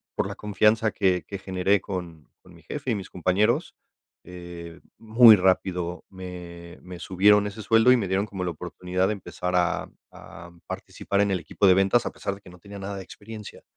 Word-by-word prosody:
por - - -1
la - - -6
confianza 105 +2 +2
que 95 -3 +1
que 100 - -7
generé 95 +1 +1
con 85 -5 -7
con 90 - -17
mi 85 - -18
jefe 140 - -4
y - - +1
mis 95 -3 -7
compañeros, 95 +6 0 0.5
eh, 85 -1 -10 0.2
muy 115 0 +7
rápido 90 -1 0
me 90 -2 -10
me 90 -1 -9
subieron 105 +3 +3
ese 105 +2 -8
sueldo 115 +3 +5
y 125 - +6
me 105 -5 -2
dieron 95 +2 0
como 95 -3 -5
la 90 - -1
oportunidad 90 +3 -3
de 105 - 0
empezar 90 -3 -4
a 90 -1 0 0.2
a 85 +1 -12 0.2
participar 100 0 -3
en 100 -1 +1
el 95 - 0
equipo 85 +4 0
de 95 - +7
ventas, 95 +5 +3
a - - -3
pesar 100 - -4
de 100 - -17
que 95 - -15
no 90 - -15
tenía 100 +3 -11
nada 100 +1 -5
de 95 - -7
experiencia, 105 +2 -11
95 Hz, 200 wpm, -25 LUFS, 90-105 Hz, 0.5 s, muy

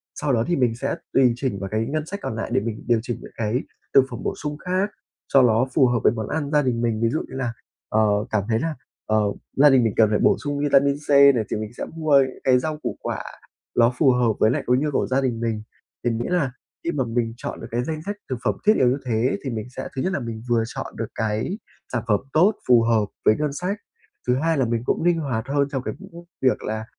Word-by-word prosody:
Sau 140 - -1
đó 115 - +2
thì 175 - +1
mình 125 -6 +1
sẽ 135 +4 -2 0.2
tùy 125 -3 +5
chỉnh 120 -6 -2
vào 95 - -4
cái 110 +2 -1
ngân 150 +3 -2
sách 200 +5 -6
còn 110 - -3
lại 115 - -3
để - - +3
mình 110 -1 -5
điều 120 -2 +3
chỉnh 120 0 -4
những - - -11
cái 115 +3 -1 0.3
thực 135 - +7
phẩm 120 - -6
bổ - - -1
sung 150 0 -5
khác 185 +5 -1 0.4
cho 135 - +5
nó 120 0 +4
phù 135 -5 +5
hợp 120 -1 +1
với - - +5
món 110 -3 -4
ăn 145 -1 -2
gia 150 -1 +4
đình 125 -3 0
mình. 115 -2 0
Ví 115 - +3
dụ 155 - -1
như - - -10
là, 125 -3 -2 0.4
ờ, 110 - +2 0.3
cảm 110 -2 +1
thấy 110 0 +2
là, 160 +2 -2 0.3
ờ, 110 - +1 0.4
gia 145 +2 +7
đình 130 -3 +5
mình 110 - +1
cần 110 -2 +5
phải 105 - +1
bổ - - +4
sung 145 0 -2
vitamin 140 -1 +3
C - - -18
này 140 -4 +6
thì - - -1
mình 110 +2 -5
sẽ - - -3
mua 155 -3 +4
những 130 -1 -1
cái 125 -1 +4
rau 155 +3 -3
củ 155 - -5
quả - - -4 0.5
ló 120 +1 +4
phù 140 -5 +5
hợp 120 -3 +2
với 110 - +5
nại - - 0
cái 125 +1 +4
nhu 150 +3 0
của - - 0
gia 130 +1 +1
đình 120 -4 -1
mình, 115 -2 -2 0.4
thì 120 - +1
nghĩa 115 +1 -2
là 170 -8 +1 0.3
khi 170 - 0
mà 145 -5 0
mình 115 0 -1
chọn - - -6
được - - -7
cái 120 +1 0
danh 155 +2 -4
sách 205 - -3
thực 130 - -2
phẩm - - +1
thiết 215 +1 +6
yếu 125 - +4
như 130 +3 +2
thế 120 +2 +1
thì 135 - -3
mình 110 -1 -4
sẽ 125 - -6
thứ 130 - -1
nhất 190 - -1
là - - 0
mình 115 -3 -6
vừa 115 -1 +3
chọn - - -7
được - - -3
cái 110 - -1 0.4
sản 120 -3 -1
phẩm 105 -3 +3
tốt, 185 +7 +4
phù 120 -2 +6
hợp 115 -2 +2 0.2
với 110 - +6
ngân 150 -2 -1
sách, 180 +7 -2 0.5
thứ 125 - +3
hai 160 +3 +1
là 130 - +2
mình 115 -1 -1
cũng - - 0
ninh 175 -1 +3
hoạt 130 -5 -2
hơn 140 0 +1
trong 135 -2 -2
cái - - -3
những 170 +1 -12 0.2
việc 130 -1 +2
là 110 +1 -3
125 Hz, 270 wpm, -23 LUFS, 115-145 Hz, 0.5 s, thực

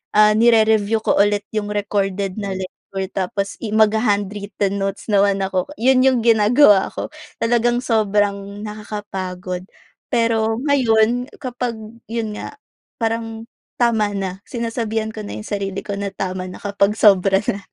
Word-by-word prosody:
ah, 210 0 +7
nire-review 220 -1 +4
ko - - +2
ulit 205 0 +3
yung 210 -1 -2
recorded 200 -2 -1
na 200 -1 -3
lecture 190 0 -6
tapos 195 +1 -2
i 215 - -3
magha-handwritten 205 -2 +1
notes 195 +3 -3
naman 200 -1 +3
ako. 185 -1 -1
Yun 255 +1 +4
yung 260 -2 +4
ginagawa 220 -1 +5
ko, - - -5 0.3
talagang 240 +1 +2
sobrang 205 -3 0
nakakapagod. 190 -4 -6 0.4
Pero 225 -1 +2
ngayon, 245 -2 +3
kapag 250 -2 -3 0.4
yun 220 -2 -3
nga, - - -7 0.4
parang 225 0 -2 0.3
tama 220 -4 +1
na. 190 -1 -3
Sinasabihan 225 -2 -2
ko 220 - -9
na - - -6
yung 210 - -7
sarili 195 -2 -3
ko 200 - -5
na 200 - -2
tama 185 -1 -3
na 180 - -10
kapag 200 0 +1
sobra 195 -2 +4
na. 200 - -6
210 Hz, 140 wpm, -20 LUFS, 195-225 Hz, 0.4 s, ah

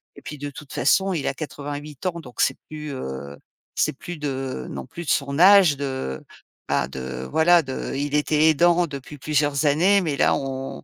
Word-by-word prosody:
et - - -13
puis 150 - -7
de 145 +1 -5
toute 145 0 -11
façon, 190 +9 +2
il 155 - -2
a - - 0
88 145 0 -7
ans, 170 -1 -2
donc 125 -4 -14
c'est - - +2
plus, 150 -2 -6
heu, 70 - -6 0.4
c'est - - +1
plus 175 +4 -8
de 135 - -4
non 65 -1 -6
plus 170 -1 -8
de - - -5
son 140 +1 0
âge 190 -5 +7
de, 130 - -4 0.5
bah, 65 - +1
de, 65 -1 -6
voilà, 165 +1 +5
de 130 -1 -5
il 145 +1 -2
était 150 +1 +3
aidant 175 +3 +4
depuis 140 +1 -8
plusieurs 145 0 0
années. 180 +8 +4
Mais 150 -5 -2
là, - - +3
on 135 0 -5
145 Hz, 195 wpm, -23 LUFS, 135-160 Hz, 0.5 s, âge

